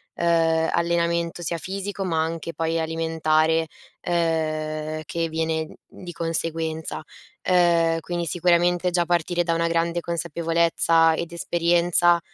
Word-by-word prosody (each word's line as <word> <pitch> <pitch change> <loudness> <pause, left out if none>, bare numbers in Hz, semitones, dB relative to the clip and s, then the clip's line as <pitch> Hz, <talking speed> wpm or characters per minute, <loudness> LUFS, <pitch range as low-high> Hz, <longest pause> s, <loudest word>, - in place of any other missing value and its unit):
uhm, 165 -1 +2
allenamento 170 0 0
sia 170 0 -2
fisico, 195 +3 -5
ma 165 -4 0
anche 165 +1 -4
poi 165 0 -1
alimentare, 160 0 +1 0.4
uhm, 155 -2 -1
che 165 +1 -2
viene 160 0 -2
di 180 -2 -10
conseguenza. 165 -1 -3 0.5
Uhm, 170 -2 +3
quindi 175 +1 -3
sicuramente 175 +2 +2
già 175 -1 +1
partire 175 0 0
da 170 -1 0
una 165 0 +1
grande 170 +1 0
consapevolezza 165 0 +2
ed 170 +1 -5
esperienza, 175 0 +2
165 Hz, 115 wpm, -23 LUFS, 160-170 Hz, 0.5 s, Uhm